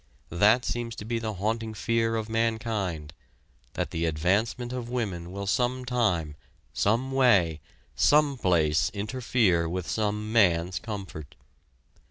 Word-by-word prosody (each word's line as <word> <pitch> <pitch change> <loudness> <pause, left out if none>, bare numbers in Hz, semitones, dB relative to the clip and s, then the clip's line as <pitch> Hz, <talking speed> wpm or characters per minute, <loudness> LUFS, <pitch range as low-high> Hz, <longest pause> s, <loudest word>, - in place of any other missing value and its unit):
That 105 +8 +4
seems 120 -1 -3
to 105 - -8
be 115 +1 -2
the 110 -2 -4
haunting 110 +3 -2
fear 115 +1 0
of 110 -1 -2
mankind 110 -8 -2 0.6
that - - -3
the 85 0 -1
advancement 100 +10 0
of 120 -2 -5
women 95 -9 -3
will 100 +1 -5
sometime, 120 - 0 0.4
someway, 115 - +2 0.4
someplace, 95 - +3
interfere 105 -6 +1
with 90 0 -4
some 105 0 -2
man's 90 -5 +3
comfort. 95 -9 -7
110 Hz, 115 wpm, -27 LUFS, 90-115 Hz, 0.6 s, That